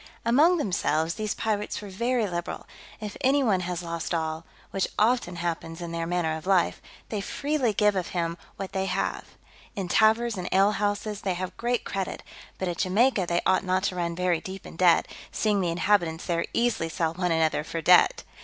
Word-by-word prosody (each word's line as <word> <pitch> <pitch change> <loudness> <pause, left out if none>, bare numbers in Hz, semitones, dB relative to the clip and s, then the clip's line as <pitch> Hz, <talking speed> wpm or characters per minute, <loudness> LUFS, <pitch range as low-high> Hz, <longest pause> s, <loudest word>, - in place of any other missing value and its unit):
Among 300 +10 +5
themselves 170 - 0
these 215 0 -3
pirates 210 -2 -2
are - - -7
very 235 +4 0
liberal: 175 -2 -4 0.3
if 210 -2 -6
any 275 +2 +3
one 205 -7 +2
has 180 -1 -3
lost 170 0 -3
all, 160 0 -3 0.3
which 195 - 0
often 220 -5 +2
happens 165 -1 -4
in 170 -1 -5
their 165 0 -3
manner 170 -2 0
of 160 +3 -8
life, 190 -3 +2 0.3
they 210 -2 -2
freely 280 +1 0
give 210 0 +3
him 170 -2 -1
of 170 - -9 0.2
what 195 -1 -6
they 190 0 -1
have. - - -2 0.5
In 195 -2 -3
taverns 220 +3 +3
and 180 -1 -4
alehouses 205 +1 +1
they 190 -2 -1
have 185 +1 -5
great 240 +1 -1
credit; 195 -1 -4 0.3
but 190 - -2
at 175 -1 -3
Jamaica 200 0 +2
they 170 0 +1
ought 185 0 +3
not 185 0 0
to 190 - 0
run 170 -1 -2
very 180 -2 +1
deep 190 +1 -8
in - - -10
debt, 175 -1 +4 0.2
seeing 210 -2 +1
the 175 - 0
inhabitants 170 -2 +1
there 170 -2 0
easily 230 -8 0
sell 165 -1 -1
one 180 0 -1
another 160 -2 +2
for 165 +1 -4
debt. 180 +2 +5
185 Hz, 190 wpm, -26 LUFS, 170-210 Hz, 0.5 s, Among